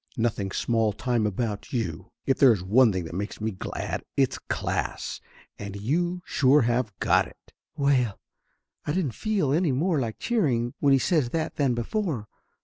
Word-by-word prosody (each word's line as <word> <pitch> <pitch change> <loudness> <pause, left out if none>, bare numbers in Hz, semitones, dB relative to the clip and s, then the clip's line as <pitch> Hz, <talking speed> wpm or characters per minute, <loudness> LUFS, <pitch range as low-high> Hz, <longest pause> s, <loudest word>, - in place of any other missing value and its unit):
Nothing 115 -4 0
small 110 +1 +1
time 120 -1 0
about 105 0 -3
you! 95 -7 -3 0.2
If 135 - +1
there 135 -3 +8
is 100 -6 0
one 115 +5 +5
thing 90 -3 -3
makes 100 +4 -4
me 110 +1 -1
glad, 95 - -4
it's - - +2
class, - - -2 0.4
and 100 -1 -6
you 175 - -1
sure 140 +2 +4
have 120 -1 +1
got - - +3
it!" - - -20 0.2
Well, 130 -7 +1 0.6
I 150 - -2
didn't 170 -7 0
feel 200 - 0
any 165 -1 +2
more 155 +4 +1
like 115 -4 -3
cheering 130 - 0
when 140 - +3
he - - +6
says 145 -3 +1
that 160 +3 -2
than 135 -4 +2
before. 135 - -2
125 Hz, 165 wpm, -26 LUFS, 105-150 Hz, 0.6 s, there